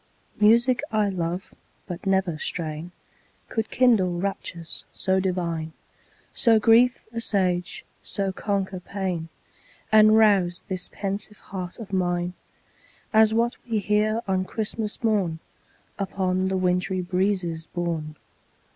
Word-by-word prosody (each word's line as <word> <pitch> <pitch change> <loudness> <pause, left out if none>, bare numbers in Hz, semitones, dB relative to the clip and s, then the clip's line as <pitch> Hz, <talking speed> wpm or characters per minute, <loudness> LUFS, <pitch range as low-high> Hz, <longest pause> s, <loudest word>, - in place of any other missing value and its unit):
Music 235 +4 +5
I 215 -2 +2
love 180 0 -3 0.3
but 180 +1 -7
never 190 -3 +2
strain 160 +1 -3 0.6
Could 220 -1 -2
kindle 195 -9 +3
raptures 175 -3 -3
so 190 0 +1
divine, 170 -4 -2 0.6
So 225 -2 +4
grief 230 +4 +4
assuage, 185 -6 -1 0.2
so 195 -1 -2
conquer 195 -1 -2
pain, 180 -3 -4 0.6
And 215 0 +7
rouse 195 -5 +3
this 185 -1 -3
pensive 200 +1 -4
heart 185 -2 -7
of 210 -4 -9
mine 175 -1 0 0.8
As 220 0 +6
that 230 +2 +1
we 225 - +1
hear 210 +2 +1
on 190 -1 +1
Christmas 215 +2 -3
morn, 200 -8 +1 0.6
Upon 190 -1 0
the 190 0 0
wintry 180 0 +1
breezes 180 -3 -1
borne. 165 -3 -3
190 Hz, 115 wpm, -25 LUFS, 175-215 Hz, 0.8 s, And